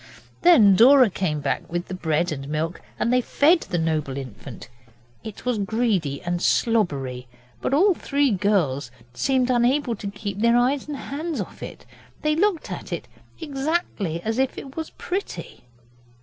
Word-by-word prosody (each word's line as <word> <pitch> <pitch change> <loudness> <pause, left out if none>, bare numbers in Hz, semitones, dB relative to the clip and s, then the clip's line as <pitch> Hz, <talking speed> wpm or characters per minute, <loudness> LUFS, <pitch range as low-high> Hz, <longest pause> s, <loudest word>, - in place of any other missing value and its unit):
Then 230 - +7
Dora 255 +1 +7
came 160 -5 -2
back 140 +3 -2
with 175 +1 -3
the - - -6
bread 165 -2 0
and 135 -2 -5
milk, 160 +3 -2 0.2
and 235 - +1
they 250 - +4
fed 320 +7 +3
the 180 - -3
noble 155 -4 -1
infant. 130 -2 -9 0.6
It 220 +1 -9
was 245 -4 0
greedy 200 - 0
and 175 0 -2
slobbery, 140 - 0 0.3
but - - -1
all 370 +8 +4
three 285 -4 0
girls 180 -10 +1 0.2
seemed 255 - +1
unable 245 +1 +2
to 200 - -6
keep 200 -1 -6
their 235 +2 +4
eyes 260 +4 +1
and 295 -2 -4
hands 310 +4 -4
off - - -6
it. - - -9 0.4
They 305 0 +2
looked 375 -1 0
at - - -7
it - - -4 0.3
exactly 275 - -2
as 225 +3 -1
if 265 -1 0
it 270 -1 -9
was 320 -1 -4
pretty. 380 - -6
220 Hz, 165 wpm, -23 LUFS, 165-275 Hz, 0.6 s, Then